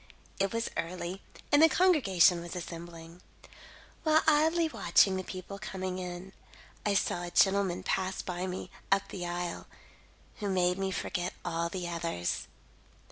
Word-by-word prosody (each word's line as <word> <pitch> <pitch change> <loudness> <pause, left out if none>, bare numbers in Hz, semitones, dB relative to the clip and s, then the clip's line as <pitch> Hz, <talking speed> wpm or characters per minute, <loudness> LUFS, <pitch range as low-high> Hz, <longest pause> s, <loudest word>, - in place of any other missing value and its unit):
It 195 0 +1
was 230 0 -2
early 180 +2 -4 0.3
and 290 - +6
the 325 - +8
congregation 200 - +4
was 170 +1 -7
assembling. 170 0 -8 0.8
While 315 -1 +4
idly 320 +2 +4
watching 190 - +3
the 185 - -2
people 185 +2 -7
coming 185 -3 -4
in, 180 +1 -6 0.5
I 205 -1 +1
saw 175 - +1
a 175 - -4
gentleman 195 -1 +3
pass 190 0 -1
by 180 0 -3
me 185 0 -5 0.2
up 195 0 +2
the 180 -2 -5
aisle, 175 0 -4 0.7
who 205 -2 -3
made 180 -1 +2
me 195 0 0
forget 180 -1 -3
all 170 -1 -1
the 180 -1 -4
others. 165 - -2
185 Hz, 145 wpm, -30 LUFS, 175-195 Hz, 0.8 s, the